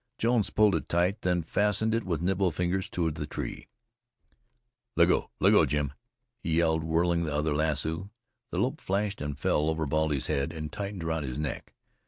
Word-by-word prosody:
Jones 115 Hz, -3 st, +2 dB
pulled 105 Hz, -2 st, +4 dB
it 80 Hz, -, -2 dB
tight, 90 Hz, +5 st, +1 dB
then 90 Hz, -2 st, +1 dB
fastened 105 Hz, +5 st, +1 dB
it 115 Hz, 0 st, +1 dB
with 85 Hz, -3 st, -2 dB
nimble 95 Hz, +1 st, +2 dB
fingers 90 Hz, +4 st, -1 dB
to 85 Hz, -2 st, 0 dB
the 75 Hz, -1 st, -5 dB
tree. -, -, -5 dB, 1.3 s
"Let -, -, +5 dB
go! -, -, +1 dB
let -, -, +5 dB
go! -, -, +6 dB
Jim!" 75 Hz, -2 st, -1 dB, 0.5 s
he 80 Hz, -, -1 dB
yelled, 80 Hz, -1 st, +2 dB
whirling 85 Hz, +1 st, +1 dB
the 75 Hz, -2 st, -2 dB
other 75 Hz, +1 st, +1 dB
lasso. 80 Hz, +4 st, -1 dB, 0.4 s
The -, -, -4 dB
loop -, -, 0 dB
flashed 100 Hz, -1 st, -1 dB
and 75 Hz, -1 st, -3 dB
fell 75 Hz, +2 st, +1 dB
over 80 Hz, 0 st, -1 dB
Baldy's 75 Hz, -1 st, 0 dB
head 70 Hz, +1 st, -1 dB
and 75 Hz, -2 st, -5 dB
tightened 100 Hz, -3 st, -4 dB
round 80 Hz, -2 st, -1 dB
his 65 Hz, 0 st, -4 dB
neck. 75 Hz, -3 st, -4 dB
80 Hz, 185 wpm, -28 LUFS, 75-95 Hz, 1.3 s, go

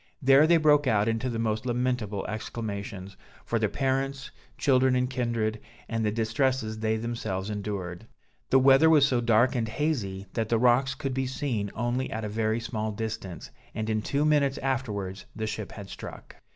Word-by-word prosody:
There 135 Hz, +2 st, +6 dB
they 170 Hz, 0 st, +6 dB
broke 150 Hz, -2 st, +4 dB
out 105 Hz, -2 st, +3 dB
into 115 Hz, +3 st, 0 dB
the 115 Hz, -, -3 dB
most 110 Hz, 0 st, -1 dB
lamentable 120 Hz, -5 st, -1 dB
exclamations, 100 Hz, -3 st, -5 dB, 0.3 s
for 115 Hz, -, 0 dB
their 105 Hz, -1 st, +1 dB
parents, 135 Hz, +1 st, -1 dB, 0.3 s
children 130 Hz, -1 st, +3 dB
and 125 Hz, 0 st, +1 dB
kindred, 115 Hz, -4 st, -1 dB, 0.3 s
and 115 Hz, -1 st, -2 dB
the 105 Hz, -, +2 dB
distresses 115 Hz, 0 st, 0 dB
they 110 Hz, 0 st, 0 dB
themselves 110 Hz, -4 st, -3 dB
endured. 100 Hz, -1 st, -5 dB, 0.4 s
The 135 Hz, -, +5 dB
weather 135 Hz, +4 st, +6 dB
was 150 Hz, -3 st, +6 dB
so 125 Hz, -4 st, +1 dB
dark 120 Hz, +1 st, +4 dB
and 120 Hz, -3 st, -1 dB
hazy, 110 Hz, -8 st, -2 dB
that 110 Hz, -2 st, -1 dB
the 115 Hz, -, +3 dB
rocks 125 Hz, +3 st, +3 dB
could 135 Hz, -1 st, -3 dB
be 130 Hz, 0 st, -1 dB
seen 125 Hz, -6 st, -2 dB
only 120 Hz, +3 st, -1 dB
at 110 Hz, 0 st, -4 dB
a -, -, -3 dB
very 110 Hz, +1 st, 0 dB
small 110 Hz, -2 st, -3 dB
distance, 105 Hz, -6 st, -5 dB, 0.2 s
and 110 Hz, 0 st, -2 dB
in 110 Hz, 0 st, 0 dB
two 140 Hz, +7 st, 0 dB
minutes 145 Hz, -3 st, +3 dB
afterwards 105 Hz, -8 st, -3 dB
the 110 Hz, -, -3 dB
ship 110 Hz, -1 st, -5 dB
had 100 Hz, -2 st, -8 dB
struck. -, -, -9 dB
115 Hz, 180 wpm, -27 LUFS, 110-130 Hz, 0.4 s, There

